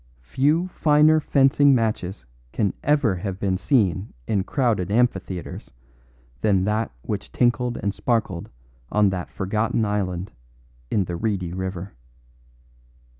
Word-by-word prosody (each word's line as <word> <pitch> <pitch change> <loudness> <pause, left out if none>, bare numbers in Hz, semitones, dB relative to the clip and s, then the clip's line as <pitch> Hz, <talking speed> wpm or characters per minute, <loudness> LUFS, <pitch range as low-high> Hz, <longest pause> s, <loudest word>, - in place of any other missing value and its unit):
Few 145 - +1
finer 155 -1 +4
fencing 140 -1 +4
matches 105 - -2 0.3
can 100 -4 0
ever 145 -10 +2
have 95 +1 -4
been 95 -2 0
seen 100 - +1
in 100 -3 0
crowded 110 -7 0
amphitheatres 100 -5 -1 0.7
than 95 -3 +3
that 105 +3 0
which - - -4
tinkled 120 0 +1
and 100 -1 0
sparkled 105 -9 -1 0.4
on 105 -1 +4
that 90 -2 -4
forgotten 110 +3 -1
island 95 -3 -2 0.6
in 100 - +1
the 90 -1 -5
reedy 95 -4 -2
river. 95 0 -5
105 Hz, 120 wpm, -23 LUFS, 95-125 Hz, 0.7 s, finer